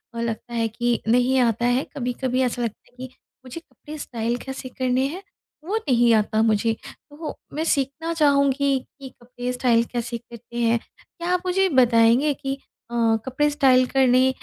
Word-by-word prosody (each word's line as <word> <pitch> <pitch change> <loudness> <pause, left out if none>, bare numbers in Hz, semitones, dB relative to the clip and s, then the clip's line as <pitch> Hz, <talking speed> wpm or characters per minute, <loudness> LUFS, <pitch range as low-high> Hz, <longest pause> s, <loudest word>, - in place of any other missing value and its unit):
अ, - - -4
लगता 235 +1 -4
है 230 -1 0
कि 240 +1 -1
नहीं 250 +3 +3
आता 235 -1 +1
है 245 +3 +2
कभी-कभी 255 0 -1
ऐसा 245 0 -1
लगता 230 0 -5
है - - -33
कि 255 - -24 0.3
मुझे 255 +6 -7
कपड़े 310 -2 -12
स्टाइल 235 -4 -3
कैसे 265 0 -7
करने 255 +1 0
हैं 365 +7 -7 0.4
वो 420 +5 -1
नहीं 240 - +3
आता 215 +1 +1
मुझे। 225 0 +2
तो 305 +1 -9 0.2
मैं 310 +2 -2
सीखना 315 +2 -1
चाहूँगी 280 -3 +2
कि 270 +1 -13
कपड़े 245 +1 -5
स्टाइल 240 -2 +2
कैसे 240 0 -3
करते 235 0 -12
हैं? 235 0 +2 0.2
क्या 340 0 -8
आप 360 - +1
मुझे 380 +1 +2
बताएँगे 245 +1 +4
कि 270 0 -4 0.4
अ, - - -8 0.3
कपड़े 295 +3 +1
स्टाइल 265 -4 +4
करने 260 -1 +4
255 Hz, 170 wpm, -23 LUFS, 235-280 Hz, 0.4 s, बताएँगे